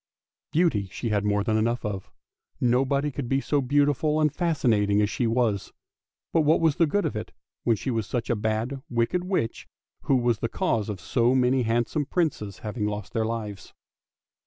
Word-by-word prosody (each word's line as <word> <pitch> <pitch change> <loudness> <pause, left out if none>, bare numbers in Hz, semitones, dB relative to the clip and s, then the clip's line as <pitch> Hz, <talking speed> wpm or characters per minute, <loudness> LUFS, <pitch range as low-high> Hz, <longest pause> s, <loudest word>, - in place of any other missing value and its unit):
Beauty 150 - +2
she 115 - -3
had 105 -1 +1
more 105 0 +1
than 110 0 +1
enough 115 +2 0
of; 100 -3 -4 0.5
nobody 135 +4 +2
could 130 -2 -5
be 135 - +2
so 145 +1 0
beautiful 145 +3 +2
and 155 -2 +2
fascinating 115 - +2
as 105 0 +2
she 120 - 0
was, 115 -4 0 0.6
but 165 - +4
what 155 +1 +4
was 160 -2 +2
the 165 -3 +4
good 205 +7 0
of - - -2
it 105 - -5 0.3
when 115 - +4
she 130 +5 -3
was 115 -3 -1
such 120 -2 -2
a 120 - +1
bad, 110 +5 -2
wicked 120 +9 0
witch, 180 - -2 0.4
who 135 - +3
was 120 -3 +2
the 115 - -2
cause 110 -2 0
of 100 -3 -4
so 120 +5 +2
many 130 0 +3
handsome 120 +5 0
Princes 145 - -1
having 105 0 -2
lost 105 -1 -5
their 110 -1 +1
lives. 105 -4 -5
120 Hz, 185 wpm, -26 LUFS, 110-140 Hz, 0.6 s, but